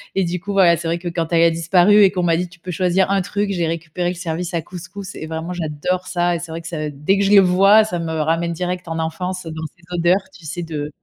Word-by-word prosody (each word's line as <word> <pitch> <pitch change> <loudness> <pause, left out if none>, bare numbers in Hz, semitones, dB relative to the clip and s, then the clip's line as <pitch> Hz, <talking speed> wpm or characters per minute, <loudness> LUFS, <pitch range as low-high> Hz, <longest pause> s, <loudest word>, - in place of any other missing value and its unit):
et 195 - +2
du 175 +1 -2
coup, 200 - -5
voilà, 185 -4 +5
c'est 165 +1 -5
vrai 165 +1 0
que 175 - -7
quand 165 -1 -3
elle 165 -1 +4
a 170 - +5
disparu 175 +5 +4
et 195 - +5
qu'on 180 - -2
m'a 170 -1 +3
dit: 180 +1 -2
«Tu 180 +1 -18
peux 180 +2 -7
choisir 185 +2 +1
un 200 -1 +2
truc» 200 +2 -2
j'ai 175 -3 0
récupéré 165 +2 -3
le 180 - -3
service 170 0 -4
à 170 - 0
couscous 185 +3 -9
et - - -6
vraiment, 160 +2 -4
j'adore 175 +2 -3
ça, 175 -1 0
et - - -3
c'est 165 -1 -8
vrai 165 +1 -5
que 165 - -9
ça 155 -3 -3
dès 150 +7 0
que - - +2
je 200 - +1
le 200 -1 +8
vois, 195 +4 +5
ça 180 -5 -3
me 165 -1 -3
ramène 165 +2 0
direct 180 +1 -4
en 165 0 -3
enfance, 180 +3 -3
dans 160 -1 -6
ces 170 - -26
odeurs, 175 +3 +2
tu 170 - -15
sais, 175 +3 -4
de 150 -3 -4
175 Hz, 285 wpm, -20 LUFS, 165-185 Hz, -, le